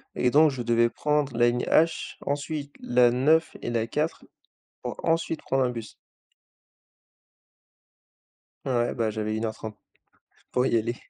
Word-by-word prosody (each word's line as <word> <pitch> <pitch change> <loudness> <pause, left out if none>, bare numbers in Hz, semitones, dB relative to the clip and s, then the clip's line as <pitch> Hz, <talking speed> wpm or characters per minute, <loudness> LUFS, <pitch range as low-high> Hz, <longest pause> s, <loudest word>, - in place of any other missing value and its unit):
et 125 - +1
donc 155 +1 +6
je 130 -3 -5
devais 120 0 +3
prendre 150 -3 -1
la 120 0 +5
ligne 120 +1 -1
H, 165 +1 +2
ensuite 145 0 -3
la 120 -1 +3
9 155 +6 +2
et - - -4
la 115 -1 0
4, 150 +8 -2 0.6
pour - - -5
ensuite 165 -1 0
prendre 135 0 +1
un 125 - +1
bus. 115 -3 -7 2.7
Ouais, 120 -2 0
bah 115 -2 0
j'avais 110 0 -3
1 110 +1 -2
heure 110 - -2
30. 110 -1 -8 0.8
pour 125 +1 +2
y 115 - +2
aller! 115 +2 -1
125 Hz, 150 wpm, -26 LUFS, 115-150 Hz, 2.7 s, donc